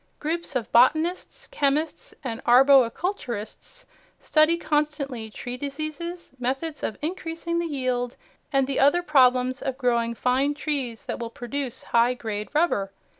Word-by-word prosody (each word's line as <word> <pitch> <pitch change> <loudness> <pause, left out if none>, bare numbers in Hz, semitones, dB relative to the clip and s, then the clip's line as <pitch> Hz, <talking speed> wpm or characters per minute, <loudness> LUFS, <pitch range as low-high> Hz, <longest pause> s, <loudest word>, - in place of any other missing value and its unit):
Groups 330 -1 -3
of 235 -4 -2
botanists, 320 - +2
chemists 295 -3 -1
and 230 -4 -5
arboriculturists 260 - +2 0.3
study 310 +2 +3
constantly 295 -7 -1
tree 245 +3 -6
diseases, 310 +5 -5
methods 270 +5 -2
of 220 - -3
increasing 335 0 -3
the 340 - -1
yield, 255 -4 -2 0.4
and 270 -2 +3
the 270 0 -2
other 290 +6 +4
problems 255 -4 +3
of 265 -2 -3
growing 235 -3 +1
fine 265 +5 +1
trees 270 -7 -3
that - - -4
will 235 -1 -4
produce 255 +2 -5
high 240 +1 +2
grade 210 -3 -4
rubber. 250 - +1
275 Hz, 130 wpm, -25 LUFS, 245-310 Hz, 0.4 s, other